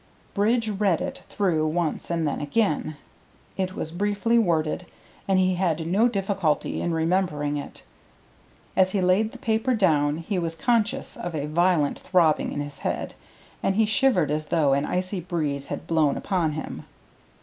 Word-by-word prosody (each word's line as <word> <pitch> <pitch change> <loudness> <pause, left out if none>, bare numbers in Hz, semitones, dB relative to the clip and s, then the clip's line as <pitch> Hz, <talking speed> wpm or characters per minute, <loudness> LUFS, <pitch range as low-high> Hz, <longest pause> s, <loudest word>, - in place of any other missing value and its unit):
Bridge 225 +3 +2
read 200 -5 +1
it - - -5
through 165 -6 +1
once 160 0 -1
and 165 -2 0
then 145 - -2
again; 155 -2 0 0.6
it 185 0 -2
was 160 - -4
briefly 205 +6 +1
worded, 170 -3 0 0.4
and 195 -1 +3
he 185 0 +3
had 170 -3 0
no 200 +8 +3
difficulty 195 -7 -1
in 175 - -1
remembering 160 -3 0
it. 145 - -7 0.9
As 185 0 +3
he 200 - +1
laid 190 +5 +2
the - - -10
paper 225 +3 0
down 150 -7 +2
he 180 +3 -2
was 165 -1 -3
conscious 235 +6 0
of 175 -2 -5
a 145 -2 -2
violent 165 -1 +2
throbbing 165 -5 +2
in 145 - -3
his 145 -1 -7
head, - - -3 0.5
and 195 - +1
he 220 +1 +4
shivered 220 - +2
as 155 0 -2
though 150 -5 +2
an 140 +2 +1
icy 185 +2 -2
breeze 150 -5 -3
had - - -5
blown 155 -4 +2
upon 175 -6 0
him. 155 - -6
175 Hz, 165 wpm, -25 LUFS, 155-200 Hz, 0.9 s, he